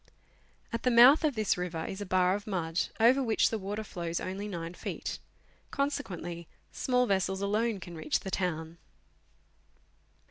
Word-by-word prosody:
At 230 - -1
the 250 - +2
mouth 250 +6 +8
of 300 -4 +1
this 215 -4 +1
river 165 -2 -3
is 190 - -6
a 205 - -5
bar 185 0 +3
of 205 +2 -4
mud, 170 -4 -1
over 245 +5 +5
which 225 -4 +2
the 225 - -1
water 205 +3 -4
flows 170 -4 -4
only 195 +3 -4
9 170 -3 -5
feet; - - -5 0.5
con 280 +1 0
sequently 175 - -6 0.2
small 250 -1 +1
vessels 190 -2 0
alone 215 +1 0
can 175 -2 -9
reach 155 -2 -1
the 190 - -6
town. 165 -3 -2
190 Hz, 165 wpm, -30 LUFS, 175-225 Hz, 0.5 s, mouth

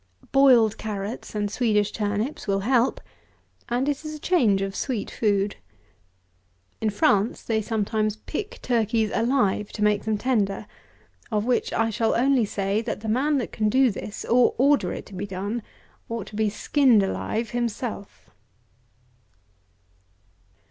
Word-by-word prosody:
Boiled 250 -6 +5
carrots 210 +1 -5
and 205 -1 -1
Swedish 210 -3 +1
turnips 210 +6 -2
will 195 0 +1
help, 245 +3 +2 0.7
and 245 +3 0
it 290 +1 -1
is 310 0 -6
a - - -9
change 230 - +2
of 195 0 -4
sweet 245 -7 -3
food. 205 -2 0 1.2
In 220 - +1
France 205 +1 +1
they 220 -1 0
sometimes 215 -1 -1
pick 220 - -6
turkeys 225 -2 +1
alive, 225 -4 +1
to 210 - -2
make 210 -1 +2
them 220 -1 0
tender; 210 -4 0 0.7
of 210 -1 0
which 245 0 0
I 225 0 +1
shall 225 +1 +1
only 255 -1 +3
say, 200 +1 -1
that 225 -2 -4
the 220 - -4
man 280 +6 +2
that 250 - -3
can 215 -1 0
do 260 +1 +4
this, 205 +1 -7
or 245 +1 +3
order 280 +3 +3
it - - -6
to 205 - -14
be 195 +2 -4
done, 200 +5 -3 0.5
ought 230 -4 -4
to 215 - -11
be 215 0 +1
skinned 240 0 +3
alive 220 +3 -2
himself. 235 -3 -4
220 Hz, 150 wpm, -25 LUFS, 205-245 Hz, 1.2 s, Boiled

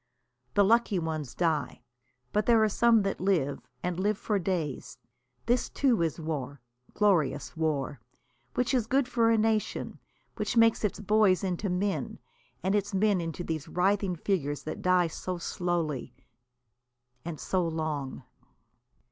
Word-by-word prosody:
The 205 - +6
lucky 225 -1 +3
ones 160 -5 -3
die, 160 -6 -1 0.5
but 210 0 +1
there 230 -2 +5
are - - +4
some 230 0 +4
that 195 -2 -2
live, 170 -8 0 0.2
and 180 0 -2
live 205 +2 +1
for 210 -1 -1
days. 170 -7 -3 0.5
This 240 +1 +1
too 250 -8 +2
is 165 -1 -1
war, 145 -4 -4 0.4
glorious 160 -9 +1
war, 150 -4 -1 0.5
which 250 +2 +1
is 240 -4 +1
good 265 +1 +2
for 235 -2 +2
a 225 - +4
nation, 220 0 -1 0.4
which 240 - -2
makes 230 -1 +5
its 210 - -1
boys 210 -2 +3
into 190 +1 -1
men, 190 +2 -1 0.5
and 190 +1 +1
its 205 -1 0
men 200 -2 +3
into 165 +1 -4
these 160 -4 -4
writhing 190 0 +1
figures 155 -5 -1
that - - -5
die 180 -1 +4
so 180 +2 -4
slowly 170 -5 -2 1.1
and 165 -2 -6
so 185 - 0
long. 155 -5 -3
185 Hz, 145 wpm, -29 LUFS, 160-210 Hz, 1.1 s, The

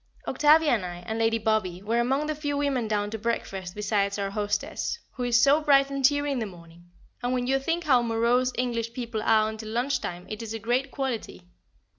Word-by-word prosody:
Octavia, 300 +1 +4
and 220 -6 +1
I, 175 -1 -5
and 220 +3 -3
Lady 225 0 +2
Bobby, 215 -5 -1
were 230 +3 0
among 265 +5 +1
the 310 - -1
few 290 -1 -3
women 275 -5 0
down 205 -1 -1
to 220 - -4
breakfast 195 -5 -3
besides 205 -1 0
our 200 -1 -2
hostess, 205 - -2
who 255 - -8
is 245 0 +3
so 280 +5 +5
bright 275 -2 +4
and 275 -1 -3
cheery 285 +1 +3
in 270 - -1
the 220 - -2
morning; 170 -1 -15 0.3
and 245 +1 -1
when 250 -1 0
you 270 +2 +2
think 330 +5 -1
how 260 -6 +4
morose 235 +2 +2
English 235 -2 -1
people 235 -3 -4
are 215 0 +3
until 220 0 -6
lunch 250 +4 0
time 175 +1 -5
it 215 0 -6
is 225 -1 -5
a - - -2
great 245 +5 0
quality. 260 -9 -4
235 Hz, 215 wpm, -26 LUFS, 210-270 Hz, 0.3 s, so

